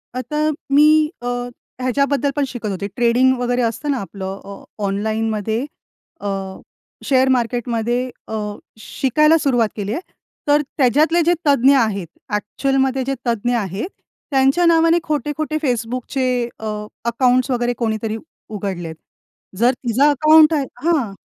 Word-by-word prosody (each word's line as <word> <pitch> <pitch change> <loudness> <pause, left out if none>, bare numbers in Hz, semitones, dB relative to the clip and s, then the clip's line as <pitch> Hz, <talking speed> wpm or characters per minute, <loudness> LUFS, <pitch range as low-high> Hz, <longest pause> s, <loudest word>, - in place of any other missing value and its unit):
आता 255 +4 -4 0.3
मी 290 +2 +6 0.4
अ, - - -3 0.5
ह्याच्याबद्दल 280 +2 +1
पण 290 - +1
शिकत 235 -4 -5
होते. 200 0 -3
ट्रेडिंग 245 +2 +3
वगैरे 245 0 0
असतं 240 +5 -1
ना, 275 - 0
आपलं. 195 -1 -6
अ, 200 - -10 0.2
ऑनलाइनमध्ये 220 +3 -1 0.6
अ, - - -4 0.8
शेअर 260 -1 +3
मार्केटमध्ये 240 -1 -1 0.3
अ, 220 - -4 0.4
शिकायला 305 +7 +2
सुरुवात 245 -7 +2
केली 205 0 -3
आहे. 330 - -3 0.5
तर 295 +1 +4 0.2
त्याच्यातले 300 +6 +3
जे 345 +2 +3
तज्ञ 275 -1 +5
आहेत. 205 -7 0 0.3
ॲक्चुअलमध्ये 265 +5 0
जे 275 - 0
तज्ञ 235 +1 0
आहेत. 205 - -3 0.4
त्यांच्या 270 +6 +3
नावाने 330 0 +4
खोटे-खोटे 305 0 -2
Facebookचे 250 +1 -1
अ, 220 - -7 0.4
अकाउंट्स 255 +2 +2
वगैरे 245 -1 0
कोणीतरी 220 -1 -2 0.3
उघडले 195 -5 -4
आहेत. 160 - -7 0.6
जर 240 +4 +4
तुझं 250 +1 0
अकाउंट 310 +2 +6
आहे 290 -3 +1 0.2
हां, 300 -11 +1
245 Hz, 130 wpm, -19 LUFS, 220-280 Hz, 0.8 s, मी